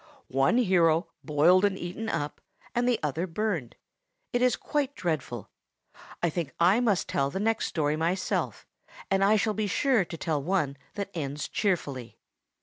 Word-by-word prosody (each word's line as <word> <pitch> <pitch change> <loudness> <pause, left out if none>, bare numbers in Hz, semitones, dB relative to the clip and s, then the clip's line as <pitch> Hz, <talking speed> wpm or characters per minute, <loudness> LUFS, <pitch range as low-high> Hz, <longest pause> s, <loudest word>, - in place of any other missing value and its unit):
One 135 - +3
hero 175 -7 +3
boiled 165 +5 +4
and 200 -2 +2
eaten 195 +6 -5
up, 150 -5 -3 0.3
and 245 +1 +2
the 240 - +2
other 155 +5 -1
burned! 175 - -2 0.6
It 245 - +1
is 250 -1 +4
quite 285 -2 -2
dreadful. 145 - -3 0.7
I 170 - +4
think 155 -5 -4
I 180 +6 +5
must 220 -7 +1
tell 140 0 0
the 190 - -4
next 225 +2 +1
story 150 -1 0
myself, 170 +4 -1 0.5
and 195 0 +3
I 205 +2 +5
shall 215 0 +1
be 215 0 -1
sure 240 +1 +2
to 165 -1 -8
tell 155 -3 -1
one 155 -4 0 0.2
that 200 -1 -4
ends 145 -3 -3
cheerfully." 145 - -2
180 Hz, 160 wpm, -28 LUFS, 150-210 Hz, 0.7 s, I